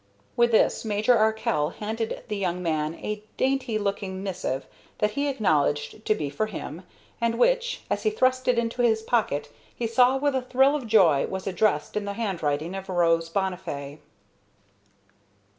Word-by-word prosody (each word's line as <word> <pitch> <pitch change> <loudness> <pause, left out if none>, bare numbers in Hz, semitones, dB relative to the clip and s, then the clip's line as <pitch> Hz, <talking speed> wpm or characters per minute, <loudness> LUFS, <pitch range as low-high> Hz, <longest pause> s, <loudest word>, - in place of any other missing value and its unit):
With 240 0 +4
this 225 - +3
Major 215 +2 +2
Arkell 220 -8 +1
handed 220 +1 -3
the 215 - -3
young 180 -2 -2
man 155 -1 -1
a 210 +3 -5
dainty 260 -4 0
looking 195 -2 -3
missive 180 -9 -3 0.3
that 210 0 +1
he 285 +6 -1
acknowledged 170 - 0
to 215 - +3
be 150 -8 -3
for 145 +10 -2
him, 175 -4 -7 0.4
and 230 0 +1
which, 485 - +2
as - - -1
he 435 - +2
thrust 255 -11 +1
it 250 -1 +3
into 235 +1 0
his 220 -2 +2
pocket, 210 -12 0 0.3
he 240 - -3
saw 250 +3 +4
with 285 +1 +1
a 260 - 0
thrill 265 +3 +3
of 270 -6 -4
joy 185 -10 +4
was 190 -1 -5
addressed 185 -5 0
in 210 -1 -1
the 200 - -3
handwriting 170 -7 -2
of 195 0 -7
Rose 165 -2 +2
Bonnifay. 165 -6 -3
210 Hz, 165 wpm, -26 LUFS, 175-235 Hz, 0.4 s, With